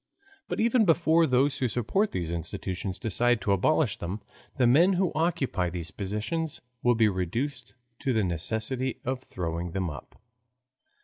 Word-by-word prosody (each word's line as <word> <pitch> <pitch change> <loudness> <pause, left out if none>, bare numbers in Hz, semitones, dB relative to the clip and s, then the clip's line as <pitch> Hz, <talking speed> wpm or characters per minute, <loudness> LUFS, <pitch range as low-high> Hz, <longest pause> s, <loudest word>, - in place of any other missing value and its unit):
But - - -3
even 230 +1 +4
before 165 -2 +4
those 135 +2 +2
who 130 - +2
support 125 - 0
these 85 -2 -3
institutions 90 +3 -4
decide 120 +2 +1
to 100 - 0
abolish 115 +5 +2
them, 90 +5 -4 0.4
the 130 - +4
men 165 +11 +5
who 185 -1 +1
occupy 150 - 0
these 85 0 -5
positions 105 - -3 0.2
will 120 0 +3
be 110 -1 +4
reduced 120 - -3 0.2
to 135 - 0
the 110 -3 +2
necessity 110 - -2
of 130 +1 -2
throwing 85 -4 -4
them 95 -4 -1
up. 75 - -11
120 Hz, 150 wpm, -28 LUFS, 95-145 Hz, 0.4 s, men